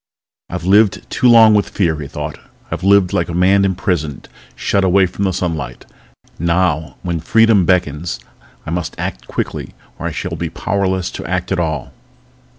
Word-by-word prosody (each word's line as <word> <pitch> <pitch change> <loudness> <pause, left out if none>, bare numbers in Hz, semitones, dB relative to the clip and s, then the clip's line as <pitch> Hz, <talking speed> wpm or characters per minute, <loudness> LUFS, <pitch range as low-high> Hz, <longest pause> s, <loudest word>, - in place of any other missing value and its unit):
I've - - -5
lived 105 +2 +3
too 125 - +3
long 115 -2 +8
with 105 -1 +2
fear, 80 -5 0
he 70 - -5
thought. - - -6 0.3
I've - - -4
lived 100 -2 +4
like 85 - 0
a 85 - -3
man 95 +2 +4
imprisoned, 90 -6 -2 0.3
shut 100 - 0
away 95 +1 +4
from 100 +2 -3
the 95 - +1
sunlight. 80 -9 -4 0.5
Now, 85 -2 0
when 85 -2 -2
freedom 110 +2 +4
beckons, 85 -6 0 0.5
I 80 - -5
must 85 -1 -3
act 60 0 -5
quickly - - -4 0.2
or - - -3
I - - -3
shall - - -4
be 85 - -3
powerless 95 +1 -1
to - - -7
act 90 +1 -2
at 95 - +1
all. 80 -5 -3
90 Hz, 170 wpm, -17 LUFS, 80-100 Hz, 0.5 s, long